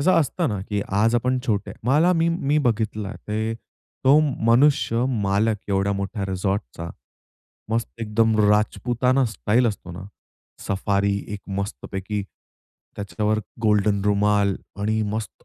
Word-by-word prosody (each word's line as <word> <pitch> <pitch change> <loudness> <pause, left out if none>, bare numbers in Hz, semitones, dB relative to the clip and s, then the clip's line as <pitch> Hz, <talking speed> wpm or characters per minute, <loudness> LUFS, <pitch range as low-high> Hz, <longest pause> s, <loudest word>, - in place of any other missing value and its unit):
तसं 185 +6 +4
असतं 160 +3 -1
ना 105 -4 -2
की 105 -1 -1 0.2
आज 115 +3 +3
आपण 125 +2 +1
छोटे 105 -3 -1
मला 150 +8 +4
मी, 165 -1 +2
मी 150 -3 +1
बघितलं 110 -5 -1
ते. 110 +1 -1 0.5
तो 135 +3 +7 0.3
मनुष्य 120 -1 +3 0.2
मालक 100 +3 +2
एवढ्या 100 0 +1
मोठ्या 100 +1 -3
रिसॉर्टचा. 95 - -3 0.8
मस्त 115 +1 -2
एकदम 110 0 +1
राजपुताना 120 +5 +2
स्टाईल 115 +5 +2
असतो 100 -5 -4
ना. 90 +2 -8 0.6
सफारी 100 +1 +1 0.2
एक 105 - -5 0.2
मस्तपैकी, 100 0 -4 0.7
त्याच्यावर 105 +1 -1 0.2
गोल्डन 105 -2 +2
रुमाल 105 -1 +2 0.3
आणि 110 +2 0
मस्त 110 -3 -5
105 Hz, 125 wpm, -23 LUFS, 100-120 Hz, 0.8 s, तो